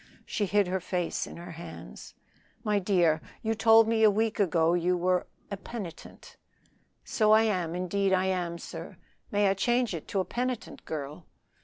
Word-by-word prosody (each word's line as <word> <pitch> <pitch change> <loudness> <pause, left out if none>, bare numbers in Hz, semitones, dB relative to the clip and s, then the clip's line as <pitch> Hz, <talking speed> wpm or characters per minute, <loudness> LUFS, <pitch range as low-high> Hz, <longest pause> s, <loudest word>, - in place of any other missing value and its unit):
She 205 - -1
hid 205 +1 +3
her 185 +1 -1
face 180 -1 -2
in - - -10
her 175 +1 -9
hands. 165 0 -10 0.5
"My 210 -2 +2
dear, 175 -5 +2 0.2
you 225 0 +1
told 225 0 +6
me 225 0 +1
a 220 - +7
week 220 +2 0
ago 165 -4 +3
you 175 +1 +1
were 180 0 +1 0.2
a 200 - -3
penitent." 195 -3 -9 0.7
"So 215 -1 +3
I 220 +1 +6
am, 180 -6 0
indeed 190 +2 0
I 190 0 +3
am. 180 -2 -1
Sir, - - -8 0.3
may 205 0 +2
I 195 - +3
change 240 +3 +1
it 165 - -6
to 195 - -1
'a 185 - 0
penitent 245 +4 -4
girl?'" 150 +2 -6
190 Hz, 175 wpm, -28 LUFS, 175-215 Hz, 0.7 s, a